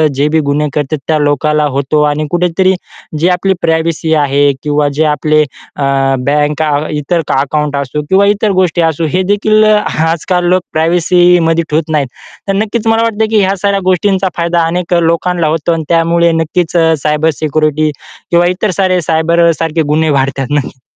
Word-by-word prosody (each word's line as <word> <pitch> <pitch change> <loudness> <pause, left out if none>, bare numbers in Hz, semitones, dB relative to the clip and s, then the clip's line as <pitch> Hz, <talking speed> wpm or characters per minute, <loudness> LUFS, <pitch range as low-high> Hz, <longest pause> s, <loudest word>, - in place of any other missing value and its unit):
जे 140 +2 +1
बी 160 +1 +1
गुन्हे 150 +1 0
करतात 150 +1 -2
त्या 155 - +1
लोकाला 150 +1 +1
होतो 140 +2 0
आणि 150 +1 -3
कुठेतरी 180 +2 +1 0.5
जे 170 +4 +2
आपली 185 +2 +1
प्रायव्हसी 160 0 0
आहे 145 -1 +2
किंवा 150 -1 0
जे 155 +3 0
आपले 155 0 +1
अ, 140 0 -9 0.4
बँका 150 +1 0 0.3
इतर 165 +4 -1
क - - -2
अकाउंट 145 +1 -1
असो 140 +1 -3
किंवा 195 +1 +4
इतर 205 +1 +1
गोष्टी 185 -3 +1
असो, 165 0 0
हे 180 +5 0
देखील 215 +2 +2
अ, 215 0 +4 0.3
आजकाल 175 +2 -1
लोक 185 0 +2
प्रायव्हसीमध्ये 170 0 +2
ठेवत 155 +1 -1
नाहीत 150 -3 0 0.4
तर 195 - 0
नक्कीच 220 +1 -2
मला 225 0 +2
वाटतं 220 -1 0
की 220 -1 +2
ह्या 195 0 +1
साऱ्या 200 +1 0
गोष्टींचा 190 +1 +1
फायदा 170 0 0
अनेक 180 +1 -2
लोकांला 170 0 0
होतो 160 +2 -1
आणि 165 -1 -3
त्यामुळे 170 0 +2
नक्कीच 165 +1 -1
अ, 165 -1 +3
सायबर 150 +1 +1
सिक्युरिटी 155 0 0 0.4
किंवा 175 0 +3
इतर 185 +4 -1
सारे 185 -2 +1
सायबरसारखे 165 0 +1
गुन्हे 160 +1 +1
वाढतात, 135 -1 -1
नक्की. 140 -3 -3
165 Hz, 170 wpm, -12 LUFS, 150-180 Hz, 0.5 s, किंवा